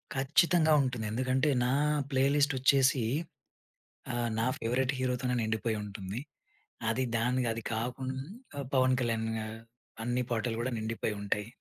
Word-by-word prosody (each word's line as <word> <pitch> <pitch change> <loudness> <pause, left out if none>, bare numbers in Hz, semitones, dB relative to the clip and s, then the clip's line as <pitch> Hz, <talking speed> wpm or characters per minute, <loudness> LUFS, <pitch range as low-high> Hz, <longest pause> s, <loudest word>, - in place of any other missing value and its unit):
ఖచ్చితంగా 155 +4 +4
ఉంటుంది. 125 -4 -2
ఎందుకంటే 130 +5 +1 0.2
నా 125 - +2 0.4
ప్లే 130 0 +3
లిస్ట్ 145 -1 +3
వచ్చేసి 135 -1 +4 1.1
ఆహ్, 120 -1 0
నా 115 - +2
ఫేవరెట్ 130 +3 +1
హీరో 130 -1 +1
తోనే 125 -1 0
నిండిపోయి 110 0 -1
ఉంటుంది. 100 +2 -5 0.7
అది 120 +4 +1
దానిది 125 +1 +1
అది 115 0 -5
కాకుం 125 +3 -2 0.6
'పవన్ 130 -1 +4
కళ్యాణ్' 115 -2 0
గా 110 - -3 0.6
అన్ని 120 +2 0
పాటలు 115 0 -1
కూడా 125 +2 -1
నిండిపోయి 110 -1 -2
ఉంటాయి. 105 +1 -1
125 Hz, 135 wpm, -31 LUFS, 115-130 Hz, 1.1 s, ఖచ్చితంగా